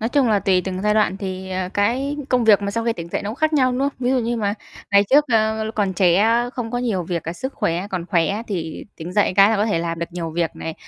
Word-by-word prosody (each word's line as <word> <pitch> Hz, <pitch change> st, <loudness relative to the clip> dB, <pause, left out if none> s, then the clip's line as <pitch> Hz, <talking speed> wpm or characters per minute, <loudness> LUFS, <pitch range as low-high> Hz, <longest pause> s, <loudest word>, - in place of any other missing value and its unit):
Nói 225 Hz, -, -1 dB
chung 265 Hz, -2 st, +2 dB
là 210 Hz, -, +3 dB
tùy 185 Hz, -2 st, +2 dB
từng 185 Hz, 0 st, -4 dB
giai 210 Hz, 0 st, +2 dB
đoạn 210 Hz, -3 st, +2 dB
thì, 190 Hz, -1 st, -6 dB
ờ, 185 Hz, -1 st, -2 dB
cái 255 Hz, +8 st, 0 dB
công 250 Hz, -2 st, +2 dB
việc 210 Hz, -2 st, +5 dB
mà 200 Hz, -, -1 dB
sau 230 Hz, +2 st, -2 dB
khi 230 Hz, -, +1 dB
tỉnh 170 Hz, -6 st, -8 dB
dậy -, -, -3 dB
nó 205 Hz, -, -3 dB
cũng -, -, -5 dB
khác 310 Hz, +4 st, 0 dB
nhau, 260 Hz, -4 st, +3 dB
đúng 250 Hz, -, -2 dB
không? 275 Hz, -, +2 dB
Ví 250 Hz, 0 st, 0 dB
dụ 265 Hz, -, +2 dB
như 235 Hz, 0 st, -1 dB
mà 205 Hz, -2 st, -1 dB, 0.4 s
ngày 200 Hz, 0 st, +5 dB
trước, 290 Hz, +2 st, +6 dB
ờ, 220 Hz, 0 st, +1 dB
còn 200 Hz, -4 st, 0 dB
trẻ 175 Hz, -1 st, +3 dB
á, 230 Hz, +4 st, +2 dB
không 245 Hz, -3 st, -5 dB
có 245 Hz, -, -2 dB
nhiều 225 Hz, -7 st, -1 dB
việc, 170 Hz, -1 st, -3 dB
cả 165 Hz, -, -4 dB
sức 260 Hz, +10 st, -6 dB
khỏe 170 Hz, +3 st, -1 dB
còn 180 Hz, -2 st, -3 dB
khỏe 190 Hz, +4 st, 0 dB
thì 165 Hz, -6 st, -4 dB
tỉnh 170 Hz, +2 st, -7 dB
dậy 205 Hz, 0 st, +2 dB
cái 200 Hz, +1 st, +7 dB
là 225 Hz, -, +2 dB
có 205 Hz, +2 st, +1 dB
thể 205 Hz, -6 st, 0 dB
làm 165 Hz, 0 st, -3 dB
được 170 Hz, -, -2 dB
nhiều 170 Hz, -2 st, -4 dB
việc 165 Hz, 0 st, -2 dB
này, 160 Hz, -, -5 dB
205 Hz, 300 wpm, -21 LUFS, 180-235 Hz, 0.4 s, cái